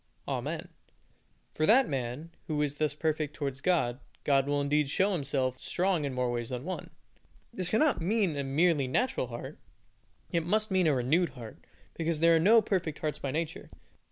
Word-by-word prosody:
Amen. - - -3 0.8
For 155 - 0
that 255 +4 +6
man 135 +4 -4 0.2
who 150 -2 -1
is 145 0 -2
thus 150 -1 0
perfect 155 -1 -1
towards 140 -2 -4
God, 130 -9 +1 0.2
God 135 -1 +3
will 145 0 +1
indeed 145 0 +1
show 195 +7 +2
Himself 135 -6 -1
strong 180 -4 0
in 140 - -3
more 125 -1 0
ways 120 -1 -3
than 125 0 -4
one! 185 +4 -5 0.6
This 185 -5 -2
cannot 230 - +2
mean 195 -2 +1
a 140 - -2
merely 145 +1 +2
natural 130 - 0
heart, 120 0 -8 0.7
it 170 -1 +1
must 215 +5 0
mean 185 -3 +3
a 150 - +3
renewed 155 +8 +2
heart, 115 -3 -9 0.3
because 165 -1 -1
there 165 +1 +5
are - - +4
no 215 +6 +6
perfect 180 -7 -1
hearts 155 -1 -3
by 140 - -3
nature. 155 +3 -4
155 Hz, 180 wpm, -30 LUFS, 135-180 Hz, 0.8 s, that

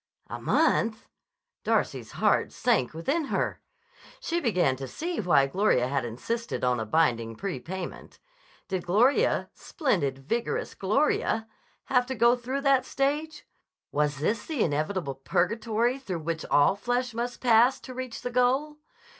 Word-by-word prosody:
A - - -5
month! 225 -1 +1 0.6
Darcy's - - -1
heart - - +2
sank 230 - +1
within 280 - -1
her. - - -2 0.6
She 340 +1 -1
began 180 - +2
to 135 0 -6
see 340 - -4
why 170 -8 +4
Gloria 135 -5 +2
had 135 -1 -1
insisted 225 - -4
on 125 -1 +2
a 110 - -4
binding 115 -5 +1
prepayment. 180 - -6 0.5
Did 185 -2 -2
Gloria, 250 - +2
splendid, 175 - -1
vigorous 225 - -2
Gloria, 220 +1 +1 0.4
have 250 -1 +1
to 260 - -3
go 235 +2 +5
through 255 +3 -4
that 275 -2 +3
stage? 295 +4 -2 0.5
Was 150 -1 0
this 210 +10 -1
the 300 -9 0
inevitable 155 0 -1
purgatory 220 - 0
through 185 -11 -5
which 160 0 -3
all 145 +6 +4
flesh 245 +3 -1
must 240 +2 -3
pass 240 +2 +4
to 255 - -9
reach 255 -2 -6
the 245 - -3
goal? 265 +5 +1
220 Hz, 140 wpm, -27 LUFS, 155-255 Hz, 0.6 s, go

